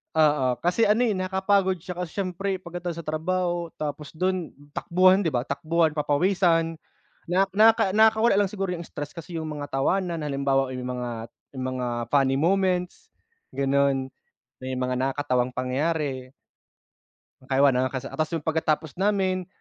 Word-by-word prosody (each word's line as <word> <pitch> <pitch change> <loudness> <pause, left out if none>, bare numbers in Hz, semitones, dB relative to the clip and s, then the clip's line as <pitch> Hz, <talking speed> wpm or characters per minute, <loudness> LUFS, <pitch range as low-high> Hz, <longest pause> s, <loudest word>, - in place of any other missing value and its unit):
oo. 150 -4 +3
Kasi 180 +6 +2
ano, 215 +4 +3
eh, 215 -5 +1
nakakapagod 190 -1 +1
siya 180 -1 -7
kasi 180 -3 -5
siyempre 190 +1 -3
pagkatapos 170 -1 -5
sa 155 - -24
trabaho 175 +3 -1 0.2
tapos 150 0 -5
dun 185 0 -1 0.2
takbuhan, 185 +4 +3
'di 160 - 0
ba? 120 - +1
Takbuhan, 155 +3 0
papawisan 165 +1 +2 0.5
nak 190 +2 +2
naka 215 -2 +5
nakakawala 220 +1 +5
lang 200 -2 +2
siguro 195 -3 -3
yung 170 - -5
stress 145 0 -7
kasi 165 0 -7
yung 160 - -4
mga 145 -1 -6
tawanan. 170 +4 0
Halimbawa, 135 -2 0
yung 125 0 -5
mga 125 -1 -3 0.5
yung 130 0 -4
mga 125 -1 -2 0.2
funny 135 -2 +3
moments 180 +1 0 0.4
gano'n, 140 -1 +1 0.6
may 130 0 -3
mga 125 0 -1
nakakatawang 130 -1 0
pangyayari. 130 0 -2 1.2
I 135 +1 +2
wanna. 130 -2 +4
Kasi, 130 -1 -6
ah, - - -10
ta's 155 +2 0
yung 160 - -4
pagkatapos 160 0 -1
namin 190 -3 +1
165 Hz, 150 wpm, -25 LUFS, 140-185 Hz, 1.2 s, naka